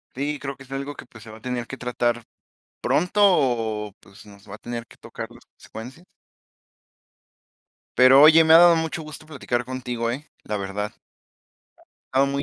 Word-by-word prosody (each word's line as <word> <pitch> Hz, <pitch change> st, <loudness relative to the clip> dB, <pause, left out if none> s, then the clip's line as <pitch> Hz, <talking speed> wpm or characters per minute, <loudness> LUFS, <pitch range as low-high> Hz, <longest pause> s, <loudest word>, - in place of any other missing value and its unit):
Sí, 145 Hz, +3 st, -2 dB
creo 140 Hz, -1 st, -5 dB
que 135 Hz, -, -14 dB
es 135 Hz, -, -17 dB
algo 140 Hz, +1 st, -5 dB
que -, -, -11 dB
pues 110 Hz, -2 st, -15 dB
se 115 Hz, -, -12 dB
va 110 Hz, -, -11 dB
a -, -, -22 dB
tener 120 Hz, 0 st, -4 dB
que 130 Hz, -, -7 dB
tratar 120 Hz, -2 st, -2 dB, 0.6 s
pronto 180 Hz, +6 st, +1 dB
o, 115 Hz, -, +1 dB
pues 100 Hz, +2 st, -17 dB
nos 100 Hz, 0 st, -16 dB
va 100 Hz, -, -8 dB
a -, -, -26 dB
tener 120 Hz, 0 st, -6 dB
que -, -, -19 dB
tocar -, -, -8 dB
las -, -, -17 dB
consecuencias. 130 Hz, +10 st, -12 dB, 1.9 s
Pero 130 Hz, +2 st, +7 dB
oye, 160 Hz, +2 st, +8 dB
me 160 Hz, 0 st, +6 dB
ha -, -, +10 dB
dado 175 Hz, -1 st, +7 dB
mucho 160 Hz, 0 st, -3 dB
gusto 155 Hz, 0 st, -10 dB
platicar 125 Hz, -5 st, -3 dB
contigo, 125 Hz, -2 st, -3 dB
¿eh? 140 Hz, +5 st, -6 dB, 0.2 s
La 105 Hz, -, -3 dB
verdad. 100 Hz, +1 st, -4 dB, 1.2 s
Estaba 135 Hz, +1 st, +4 dB
muy 140 Hz, 0 st, -2 dB
125 Hz, 185 wpm, -23 LUFS, 115-145 Hz, 1.9 s, ha